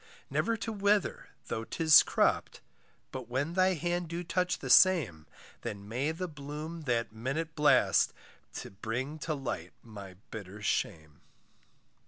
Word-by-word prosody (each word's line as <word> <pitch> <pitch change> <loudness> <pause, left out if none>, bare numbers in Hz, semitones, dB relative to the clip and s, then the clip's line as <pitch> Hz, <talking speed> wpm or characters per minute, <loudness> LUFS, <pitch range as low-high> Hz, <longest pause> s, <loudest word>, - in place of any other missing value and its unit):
Never 230 0 +1
to 225 - -4
wither 205 0 +1 0.2
though 110 - -3
'tis 155 +5 +6
cropped, - - +1 0.5
But 130 -3 -7
when 140 +6 -1
thy 185 0 +3
hand 175 +1 -2
do 170 +2 -4
touch 180 +1 0
the - - -7
same, 135 - +5 0.3
Then 100 0 -6
may 130 +8 -1
the 180 +3 -4
bloom 150 +2 -7
that 120 -3 0
minute 140 +8 -3
blast 150 -1 +4 0.4
To - - -7
bring 120 +9 -4
to 155 +1 -2
light 135 -3 -5
my 100 -5 -10 0.2
bitter 105 -1 -8
shame. 80 -6 -2
145 Hz, 140 wpm, -31 LUFS, 110-170 Hz, 0.5 s, tis